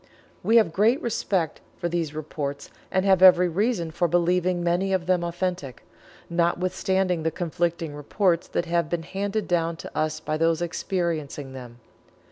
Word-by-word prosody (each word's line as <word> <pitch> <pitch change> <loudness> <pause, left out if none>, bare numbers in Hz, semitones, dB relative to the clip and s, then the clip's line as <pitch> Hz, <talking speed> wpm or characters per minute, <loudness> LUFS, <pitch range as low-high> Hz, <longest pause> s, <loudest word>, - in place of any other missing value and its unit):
We 225 - +2
have 215 -8 +5
great 225 - +3
respect 190 -8 -1 0.2
for 175 - -2
these 165 -3 -2
reports, 145 -2 -5 0.2
and 190 0 +1
have 190 -2 +4
every 180 -1 +8
reason 180 -1 0
for 175 +2 +1
believing 175 +1 +1
many 180 +3 +1
of 185 -2 0
them 180 -1 +1
authentic, 170 -6 -3 0.4
notwithstanding 180 +1 0
the 160 - +1
conflicting 170 -1 -2
reports 170 +4 0
that - - -2
have 170 -2 0
been 170 -1 -2
handed 200 +4 -3
down 170 -2 0
to - - -10
us 155 0 -1
by 155 0 -2
those 165 0 +2
experiencing 165 -5 -3
them. 125 -2 -10
175 Hz, 155 wpm, -25 LUFS, 160-185 Hz, 0.4 s, every